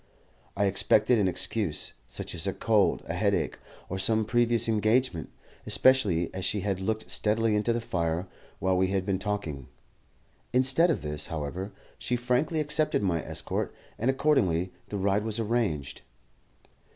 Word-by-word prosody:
I 100 - +2
expected 110 +4 +3
an 100 - +2
excuse, 90 -2 -2
such - - -5
as - - 0
a - - 0
cold, - - +2
a - - -4
headache, - - 0 0.3
or 95 - -4
some 110 +3 +3
previous 120 0 +3
engagement, 110 - +1 0.4
especially 105 -11 +3
as 95 - -5
she 100 +2 0
had 95 -1 -1
looked 110 +3 -2
steadily 110 +1 +1
into 105 +3 +1
the 120 - 0
fire 85 -4 -1 0.3
while 95 +1 +1
we 95 +1 +2
had 95 -1 -1
been 95 -2 0
talking. 95 -10 -4 0.9
Instead 135 +7 +4
of 145 - -1
this, 75 -1 -2
however, 80 +6 -4 0.3
she 125 +1 -1
frankly 125 +6 0
accepted 150 -4 +2
my 85 -4 +1
escort, - - -4 0.2
and 120 - +1
accordingly 100 - +1 0.2
the 105 - -3
ride 100 +1 +1
was 110 0 -3
arranged. 110 - -1
105 Hz, 150 wpm, -28 LUFS, 95-120 Hz, 0.9 s, Instead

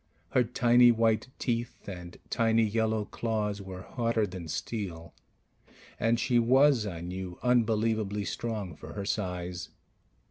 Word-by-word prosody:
Her 125 - +3
tiny 120 0 +5
white 115 0 +2
teeth 120 -1 -3
and 90 -3 -8
tiny 115 -1 +3
yellow 110 0 +1
claws 105 -2 -2
were 95 -1 -8
harder 115 -2 0
than 90 -3 -7
steel; 85 -2 -5 0.9
and 115 +1 +2
she 120 -2 +3
was, 130 -1 +4
I 85 -4 -5
knew, 90 0 -5
unbelievably 110 -4 +1
strong 105 -8 -4
for - - -10
her 100 -1 -4
size. 90 -3 -3
110 Hz, 130 wpm, -29 LUFS, 95-115 Hz, 0.9 s, tiny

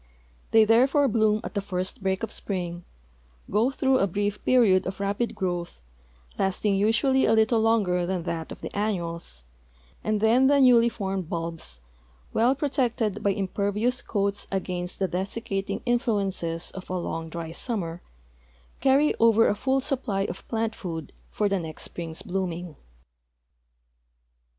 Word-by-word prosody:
They 220 -1 +6
therefore 265 +6 +4
bloom 215 -2 +2
at - - -6
the 200 - -1
first 185 -1 -4
break 190 +2 -1
of 225 - -3
spring, 175 -3 -4 0.7
go 215 +4 +3
tb 270 - -6
rough 260 - +4
a 195 - +3
brief 205 +2 -2
jieriod 205 -8 +4
of 190 +1 -5
rapid 200 +4 -1
growth, 175 - -3 0.6
lasting 195 +2 +1
usually 225 +7 +3
a 225 - +4
little 220 +1 +3
longer 205 -6 +2
than 185 -2 -2
that 165 -1 -4
of - - -9
the - - -7
annuals, 170 - -3 0.6
and 215 -1 0
then 235 +5 +4
the 285 0 +4
newly 240 -3 +6
formed 195 -6 -4
bulbs, 165 - -5 0.5
well 240 +4 +3
])rotected 250 -7 -1
by 200 - +2
impervious 205 +5 0
coats 200 -1 -2
against 180 -2 -3
the 190 - 0
desiccating 195 +2 -3
influences 195 -8 -1
of 190 - -9
a 185 - -1
long, 165 -2 -4
dry 165 0 -6
summer, 175 -3 -3 0.8
carry 275 +3 +4
over 230 0 +5
a - - +3
full 265 +6 +1
supply 255 -8 -1
of 190 -1 -5
plant 225 -1 -1
food 170 -8 -6 0.2
for 210 - 0
the 195 -1 0
next 160 -2 -6
spring's 165 -2 -6
blooming. 175 -3 -3
200 Hz, 150 wpm, -26 LUFS, 180-230 Hz, 0.8 s, They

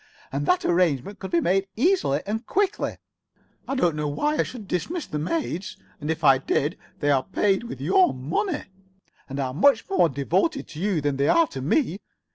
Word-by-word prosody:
And - - -2
that 360 0 +2
arrangement 175 0 +1
could 190 - -6
be 170 - +2
made 195 +3 +1
easily 265 - +2
and 220 +3 -3
quickly. 405 0 0 0.7
I 275 - -2
do 175 - +2
not 150 0 -3
see 145 - -1
why 300 +1 0
I - - +6
should 225 -6 -6
dismiss 305 - -2
the 150 - -4
maids, 185 - -3 0.2
and 150 0 -5
if 160 0 -2
I 135 -2 +6
did 145 +4 0 0.3
they 145 -1 +3
are 135 -2 +3
paid 200 +2 +1
with 135 - -7
your 180 +5 +4
money, 165 - -2 0.7
and 135 +1 -4
are 130 -2 -2
much 275 - +3
more 375 - +4
devoted 175 - 0
to 150 - -9
you 190 -4 0
than 145 -1 -1
they 140 +1 +2
are 335 - +5
to 135 - -6
me. 195 - +1
180 Hz, 200 wpm, -25 LUFS, -, 0.7 s, I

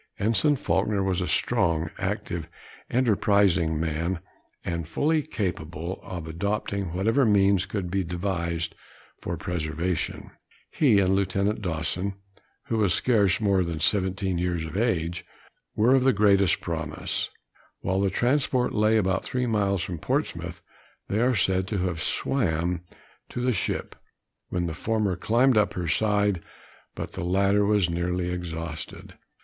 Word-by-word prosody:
Ensign 115 +8 +3
Faulkner 105 -6 0
was 95 -1 0
a 90 - -1
strong, 80 -1 +1
active, 85 -2 -3 0.4
enterprising 100 -9 +3
man, 80 +3 -1 0.5
and 85 -2 -3
fully 155 - +1
capable 90 - -4
of 90 -4 -6
adopting 100 +2 -2
whatever 115 +9 +2
means 100 -3 +4
could 90 -2 -3
be 95 0 +1
devised 85 -2 -2 0.5
for - - -3
preservation. 85 0 -2
Both - - -15 0.4
he 125 -9 +4
and 95 -1 +3
Lieutenant 100 +2 0
Dawson, 90 +2 -1 0.5
who 115 - -1
was 100 -5 +3
scarce 105 -6 +3
more 100 -3 +2
than 85 -2 -3
17 95 +1 +1
years 85 -2 -1
of 80 +1 -7
age, 90 -5 0 0.5
were 115 +5 +4
of 135 -1 +4
the 135 0 +4
greatest 100 -3 +4
promise. 80 -3 -2 0.5
While 95 +1 0
the 100 - +2
transport 125 +3 +1
lay 110 +1 +3
about 95 -2 +1
three 125 0 -1
miles 100 -5 +1
from 85 -1 -5
Portsmouth, - - -2 0.5
they 105 +3 +1
are 125 +1 +3
said 95 -1 +1
to 105 - -2
have 85 -3 -2
swam 85 - 0 0.5
to - - -5
the 125 0 +1
ship, 95 - -2 0.5
when 90 -1 -1
the 85 - -3
former 105 +2 0
climbed 120 +7 +3
up 105 - +1
her 90 -2 -2
side, 105 +1 +2 0.5
but - - -5
the 95 - -4
latter 100 +3 +3
was 100 -3 +3
nearly 90 +1 -1
exhausted. 80 -3 -6
95 Hz, 145 wpm, -26 LUFS, 85-105 Hz, 0.5 s, means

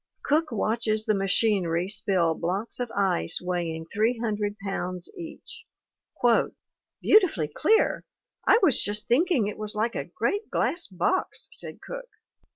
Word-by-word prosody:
Cook 305 +1 +1
watches 220 0 0
the 215 - +2
machinery 195 -3 +1
spill 190 -5 +1
blocks 185 +10 -3
of 245 -1 -2
ice 195 - +1
weighing 170 -3 -3
300 215 -2 0
pounds 185 -2 -3
each. 420 +6 -10 1.3
"'Beautifully 340 - +4
clear! 440 - +2 0.4
I - - +7
was 300 -9 +5
just 210 +1 -1
thinking 270 - +3
it 205 +1 -5
was 215 -1 -4
like 225 +3 0
a - - -3
great 410 +2 -2
glass 345 0 0
box/ 200 - -1
said - - -6
Cook. - - -7
215 Hz, 130 wpm, -26 LUFS, 185-280 Hz, 1.3 s, I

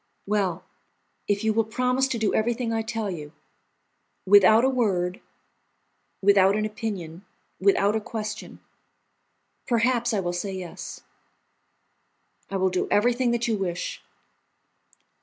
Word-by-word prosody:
"Well, 195 -4 -1 0.6
if 205 0 0
you 220 0 +2
will 225 +1 +2
promise 250 +4 0
to 260 - -2
do 220 -2 0
everything 230 +1 0
I 225 - 0
tell 220 -2 -3
you, 150 -3 -8 0.9
without 205 +4 +6
a - - +4
word, 190 -8 0 1.0
without 195 0 +5
an 215 0 0
opinion, 200 -6 -5 0.4
without 200 +2 +3
a 220 - 0
question, 215 0 -6 1.1
perhaps 240 0 +2
I 210 - 0
will 175 -2 -2
say 190 +3 -3
yes." 185 -2 -7 1.5
"I 195 - -2
will 190 0 +1
do 185 - -1
everything 240 +4 +2
that 235 0 0
you 220 -3 0
wish!" 180 -2 -3
210 Hz, 125 wpm, -25 LUFS, 190-230 Hz, 1.5 s, without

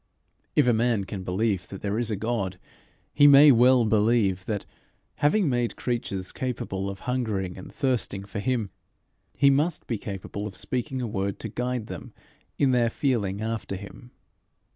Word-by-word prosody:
If 150 - +5
a 125 - +4
man 115 -2 +1
can 95 0 -6
believe 95 +1 -1
that 95 - -9
there 105 +2 -1
is 120 -2 0
a 110 - 0
God, 100 -3 -2 0.6
he 145 -1 +6
may 145 +1 +9
well 125 0 +5
believe 105 -3 +2
that, 105 -3 -2 0.5
having 165 +6 +3
made 120 -3 0
creatures 100 -6 -3
capable 100 -6 -3
of 100 -1 -8
hungering 110 -8 -2
and 95 - -10
thirsting 125 -8 -1
for 100 +1 -5
him, 115 -3 -1 0.7
he 140 0 +5
must 150 +4 0
be 115 -4 -3
capable 100 +1 -5
of 100 -3 -9
speaking 130 +3 -3
a - - -2
word 100 -2 -2
to 110 - -4
guide 125 +1 -2
them - - -9 0.4
in 135 -2 +3
their 120 -2 +3
feeling 110 -7 -1
after 110 -3 -3
him. 100 +5 -10
115 Hz, 165 wpm, -26 LUFS, 100-125 Hz, 0.7 s, may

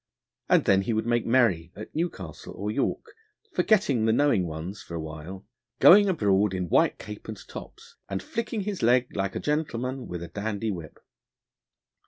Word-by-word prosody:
And - - +4
then 95 0 +4
he 105 +4 -1
would 110 +1 0
make 120 0 +1
merry 110 -9 +2
at 105 - -9
Newcastle 95 - -4
or 105 +1 -3
York, 135 - -1 0.5
forgetting 190 - +2
the 110 - +4
knowing 115 -8 +3
ones 85 +6 -6
for 85 - -8
a - - -3
while, 80 +5 -8 0.3
going 200 +2 +8
abroad 105 - +2
in 90 -2 -3
white - - +3
cape 105 +1 -9
and 110 -1 -6
tops, - - -11
and 95 -1 -3
flicking 230 -1 -3
his 200 -1 -4
leg 125 +2 +3
like 95 -1 -2
a - - -1
gentleman 130 -4 -2
with 85 -1 -5
a - - -6
dandy 105 +4 -3
whip. 85 -5 -8
105 Hz, 175 wpm, -27 LUFS, 95-130 Hz, 0.5 s, going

